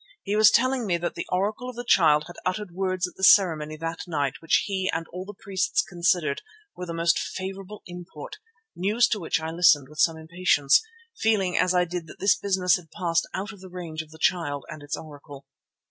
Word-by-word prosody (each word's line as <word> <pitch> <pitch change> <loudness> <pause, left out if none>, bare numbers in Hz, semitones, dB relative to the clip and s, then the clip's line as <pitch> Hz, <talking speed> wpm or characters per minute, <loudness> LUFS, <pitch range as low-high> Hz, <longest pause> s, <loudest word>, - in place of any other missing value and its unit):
He 205 0 -1
was 215 0 +7
telling 255 0 +2
me 175 -2 +1
that 175 0 -3
the - - -6
Oracle 205 +7 -1
of 250 - -8
the 245 +1 -6
Child 155 -8 +5
had 175 - -11
uttered 185 +1 -3
words 185 -1 -1
at 180 - -13
the 190 - -9
ceremony 155 -6 +5
that 165 +1 -4
night 145 -5 -1
which 165 - +2
he 190 -2 -2
and 165 0 -3
all 180 +2 -7
the 205 +1 -9
priests 195 +2 0
considered 170 -5 0 0.3
were 180 - -6
of - - -14
the 170 - -4
most 170 0 +2
favourable 195 +2 -6
import, 175 - -9 0.4
news 210 +6 +2
to 215 - 0
which 165 -2 -1
I 160 0 -4
listened 165 -5 +4
with 150 0 -13
some 160 0 +3
impatience, 160 -3 +3 0.4
feeling 200 -5 +1
as 180 0 +2
I 180 0 +3
did 175 -1 -5
that - - -12
this 195 - +4
business 185 -3 +2
had 170 -3 -14
passed 170 0 -1
out 200 +4 -4
of 205 - -14
the 185 0 -11
range 170 -3 -6
of 160 - -14
the 160 - -14
Child 145 -5 0
and 155 -2 -8
its 145 0 -4
Oracle. 145 -2 -11
180 Hz, 220 wpm, -25 LUFS, 160-195 Hz, 0.4 s, was